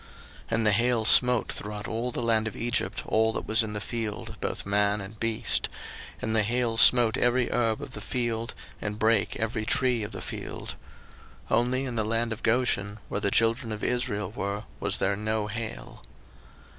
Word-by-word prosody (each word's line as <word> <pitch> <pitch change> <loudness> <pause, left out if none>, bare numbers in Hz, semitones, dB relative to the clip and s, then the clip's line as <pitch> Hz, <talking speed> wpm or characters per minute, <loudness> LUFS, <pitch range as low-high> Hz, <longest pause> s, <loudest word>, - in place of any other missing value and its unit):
02:009:025 - - -20 0.5
And 115 -1 +1
the 105 - +5
hail 115 +1 +2
smote 125 0 +5
throughout 105 0 -6
all 115 +3 -2
the 120 - -2
land 110 -1 +2
of 110 - -6
Egypt 120 +1 -2
all 110 0 +2
that - - -4
was 110 +2 +3
in 110 -1 -3
the 105 - -2
field, 110 0 -5
both - - -3
man 100 +1 +1
and 100 +2 -9
beast; 115 -1 +1 0.5
and 110 0 -2
the 110 - +5
hail 115 +2 0
smote 115 -1 +6
every 120 0 +2
herb 115 -2 +1
of - - -8
the 105 - -8
field, 115 0 -2 0.3
and 105 0 -3
brake 110 -1 +2
every 110 +1 -2
tree 125 +1 +2
of 105 - -5
the - - -7
field. - - -6 0.8
02:009:026 - - +4
Only 130 +2 0
in 125 -2 -4
the 110 - +2
land 115 +1 0
of 110 - -10
Goshen, 110 -4 +1
where 105 - -2
the 100 - +2
children 115 +3 +2
of 105 0 -5
Israel 115 -6 -1
were, 100 -1 -4 0.2
was - - 0
there 100 +1 +1
no 110 +1 -1
hail. 105 - -5
110 Hz, 195 wpm, -27 LUFS, 105-120 Hz, 0.8 s, smote